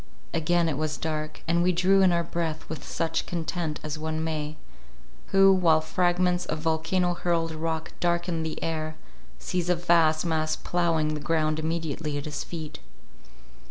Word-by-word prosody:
Again 170 +1 +2
it 150 -3 -1
was 155 -1 -1
dark, 155 -1 -4
and 170 +1 +3
we 180 +1 +3
drew 185 +3 +4
in 185 -2 +5
our 170 0 +2
breath 165 -2 -3
with 160 - -6
such 165 -1 -2
content 165 -2 -3
as 155 0 -4
one 160 0 -2
may, 155 -1 -3 0.7
who, 195 0 +6
while 170 -4 +4
fragments 180 +2 +1
of 155 - -2
volcano 165 +3 +1
hurled 170 -2 0
rock 160 0 -3
darken 175 -1 0
the 160 -1 -3
air, 155 -1 -2 0.4
sees 180 - -2
a 180 - +4
vast 170 -2 +3
mass 155 -1 +1
ploughing 165 -3 0
the 150 - -3
ground 155 0 0
immediately 160 -2 -2
at 145 - -4
his 150 -1 -4
feet. 155 -3 -7
165 Hz, 160 wpm, -27 LUFS, 155-175 Hz, 0.7 s, who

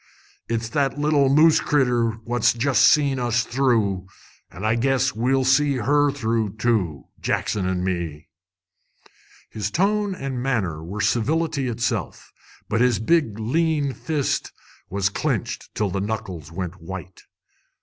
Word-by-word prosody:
It's 115 0 -1
that 140 +1 0
little 145 -2 +3
moose 155 +3 +5
critter 125 -5 +2
what's 120 0 +2
jest 130 +3 +2
seen 140 -3 +3
us 120 -1 +1
through, 115 -7 0 0.4
an' 95 +5 -7
I 110 - +3
guess 130 +2 +1
we'll 130 +4 +1
see 140 +2 +3
her 145 +4 +2
through, 115 -6 -1
too, 105 - 0 0.2
Jackson 95 -3 -1
an' 90 -1 -1
me!" 85 -5 -3 1.2
His 105 -2 -3
tone 200 - +1
and 135 -5 -4
manner 100 -12 -1
were 100 +6 -5
civility 145 +4 0
itself, 115 - -3 0.3
but 115 +2 0
his 125 -3 +3
big 115 - +1
lean 145 +4 0
fist 150 -2 -2 0.4
was 100 0 0
clenched 100 - -2
till 105 -3 0
the 95 - -2
knuckles 95 -7 -5
went 90 +1 -5
white. 95 +1 -8
120 Hz, 135 wpm, -23 LUFS, 100-140 Hz, 1.2 s, moose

